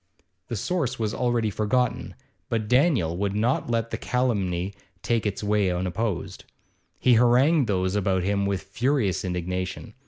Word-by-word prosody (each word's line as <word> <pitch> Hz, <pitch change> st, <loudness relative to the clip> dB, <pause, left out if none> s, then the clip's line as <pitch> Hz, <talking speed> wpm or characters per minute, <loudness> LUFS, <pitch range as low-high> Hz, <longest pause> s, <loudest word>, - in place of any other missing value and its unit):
The 120 Hz, -, -4 dB
source 130 Hz, -, -1 dB
was 110 Hz, -2 st, -1 dB
already 120 Hz, -3 st, 0 dB
forgotten, 115 Hz, +3 st, -1 dB, 0.3 s
but 110 Hz, -3 st, -1 dB
Daniel 125 Hz, -, +3 dB
would 100 Hz, +1 st, -1 dB
not 120 Hz, +4 st, 0 dB
let 115 Hz, -1 st, -1 dB
the -, -, -3 dB
calumny 100 Hz, -7 st, -1 dB, 0.3 s
take 115 Hz, -2 st, +1 dB
its 100 Hz, +1 st, -3 dB
way 105 Hz, -2 st, +2 dB
unopposed. 90 Hz, +2 st, -3 dB, 0.5 s
He 125 Hz, -, +4 dB
harangued 125 Hz, +5 st, +4 dB
those 95 Hz, -2 st, 0 dB
about 95 Hz, -2 st, +1 dB
him 100 Hz, +1 st, 0 dB
with 100 Hz, -1 st, -2 dB
furious 105 Hz, -, 0 dB
indignation. 90 Hz, 0 st, -4 dB
105 Hz, 145 wpm, -25 LUFS, 95-120 Hz, 0.5 s, He